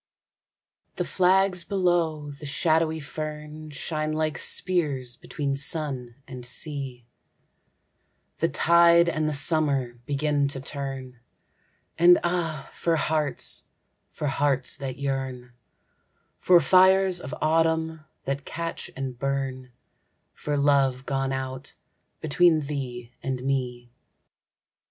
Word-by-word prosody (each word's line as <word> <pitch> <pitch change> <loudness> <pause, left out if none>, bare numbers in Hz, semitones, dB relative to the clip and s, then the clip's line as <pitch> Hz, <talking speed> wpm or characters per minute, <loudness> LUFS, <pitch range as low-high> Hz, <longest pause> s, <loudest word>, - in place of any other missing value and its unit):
THE - - -2
flags 185 -1 +3
below 170 -6 0
the 145 +1 -9
shadowy 160 +2 +1
fern 155 +1 -7
Shine 155 +1 -3
like 155 0 -1
spears 145 -9 0
between 140 +1 -3
sun 135 -4 -2
and 130 -3 -8
sea, 130 -1 -1 1.3
The - - +2
tide 170 - +5
and 155 -2 0
the 150 - -2
summer 140 -5 +1
begin 145 0 +1
to 140 -1 -4
turn, 135 -2 -6 0.8
And 175 +1 +8
ah, 165 -5 -2
for 165 -1 0
hearts, 155 -2 -1 0.4
for - - -6
hearts 140 -2 0
that 130 -2 -5
yearn, 130 -3 -4 0.8
For 180 -1 +5
fires 185 +1 +5
of 130 - -6
autumn 160 0 +1 0.2
that 140 0 -2
catch 165 +2 -5
and 130 -2 -5
burn, 135 -2 -3 0.6
For 145 -1 -3
love 135 -2 +2
gone 135 -1 -1
out 130 +1 -5 0.5
between 160 +1 +4
thee 130 -5 -5
and 130 -2 -3
me. 125 -3 -2
145 Hz, 110 wpm, -26 LUFS, 135-160 Hz, 1.3 s, And